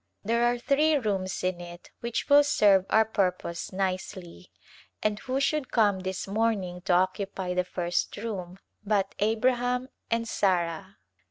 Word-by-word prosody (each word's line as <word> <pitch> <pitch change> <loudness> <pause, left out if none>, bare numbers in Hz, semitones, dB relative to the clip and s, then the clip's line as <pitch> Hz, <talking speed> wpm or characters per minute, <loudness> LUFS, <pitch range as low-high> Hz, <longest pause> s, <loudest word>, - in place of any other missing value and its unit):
There 230 +3 +1
are 240 0 +2
three 295 +5 +2
rooms 195 -9 -2
in 185 -1 -1
it 175 0 -11
which 235 0 -3
will 290 0 +7
serve 200 -8 +4
our 220 0 +4
purpose 185 -5 -2
nicely, 185 - -4 0.5
and 210 0 0
who 260 +1 -2
should 280 0 0
come 205 -4 +3
this 190 +1 -4
morning 200 -4 -1
to 190 - +2
occupy 185 0 0
the 180 0 +1
first 175 -1 -2
room 195 -5 -5 0.3
but 200 -2 0
" - - -38
Abraham 245 +4 +1 0.2
and 230 0 0
Sarah 185 -2 -1
200 Hz, 150 wpm, -27 LUFS, 185-230 Hz, 0.5 s, will